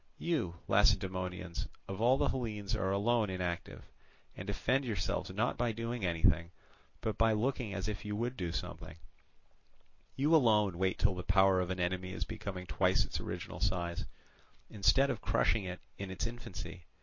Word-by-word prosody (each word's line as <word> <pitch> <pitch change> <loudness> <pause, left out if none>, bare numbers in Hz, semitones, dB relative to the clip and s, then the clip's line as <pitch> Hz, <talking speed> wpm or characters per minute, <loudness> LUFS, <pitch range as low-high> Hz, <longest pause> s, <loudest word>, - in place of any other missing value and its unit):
You, 145 - -1
Lacedaemonians, 90 -2 +1 0.2
of 95 +2 -5
all 125 +3 +5
the 145 0 +2
Hellenes 110 -5 -3
are 95 -2 0
alone 105 +2 +2
inactive, 90 -2 -4 0.5
and - - -7
defend 135 +3 +1
yourselves 105 -8 -2
not 105 +7 -1
by 120 -1 +2
doing 115 0 -4
anything 85 -1 +3 0.5
but 110 - -2
by 115 0 +5
looking 120 0 0
as 95 0 -2
if 105 -2 -4
you 105 0 -3
would 120 +4 -1
do 90 -7 -3
something; 85 - -6 1.2
you 150 +5 +4
alone 105 - +4
wait 95 -1 +1
till - - +3
the 90 - -4
power 95 0 +4
of 90 -1 -1
an 95 0 -2
enemy 90 +1 -1
is - - -2
becoming 100 -4 -5
twice 80 - +2
its - - -4
original - - -5
size, 85 -2 -1 0.7
instead 120 +7 +4
of - - -4
crushing 105 -3 +2
it 90 0 -5 0.2
in 100 -1 -4
its 95 +3 -3
infancy. 105 -8 -7
100 Hz, 165 wpm, -33 LUFS, 90-115 Hz, 1.2 s, all